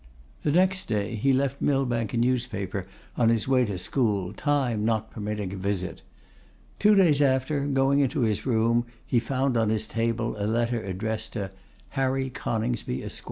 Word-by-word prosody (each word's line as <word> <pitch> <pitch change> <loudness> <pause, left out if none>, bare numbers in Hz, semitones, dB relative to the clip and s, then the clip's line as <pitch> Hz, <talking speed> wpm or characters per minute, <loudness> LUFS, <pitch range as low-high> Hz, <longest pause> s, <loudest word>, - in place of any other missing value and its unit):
The 150 - +1
next 185 +3 +2
day 105 0 -1
he 115 +5 +2
left 135 +1 0
Millbank 125 -6 +1
a - - 0
newspaper 115 -6 -1 0.3
on 115 -2 +3
his 115 0 +2
way 130 -2 +4
to 100 -4 -3
school, 100 -1 0
time 130 -6 0
not 110 0 0
permitting 105 -3 -4
a - - -5
visit. 95 -1 -3 0.8
Two 210 0 +5
days 165 -7 +4
after, 140 +1 +1
going 135 0 +3
into 140 +1 +1
his 110 -3 +1
room, 115 -1 +2 0.2
he 120 - +2
found 130 +1 0
on 110 -2 +2
his 110 0 +1
table 115 0 -1
a 100 - 0
letter 115 +1 0
addressed 110 +4 -3
to 100 -4 -4 0.4
'Harry 135 0 -1
Coningsby, 115 - -2
Esq. - - -3
115 Hz, 165 wpm, -26 LUFS, 105-135 Hz, 0.8 s, Two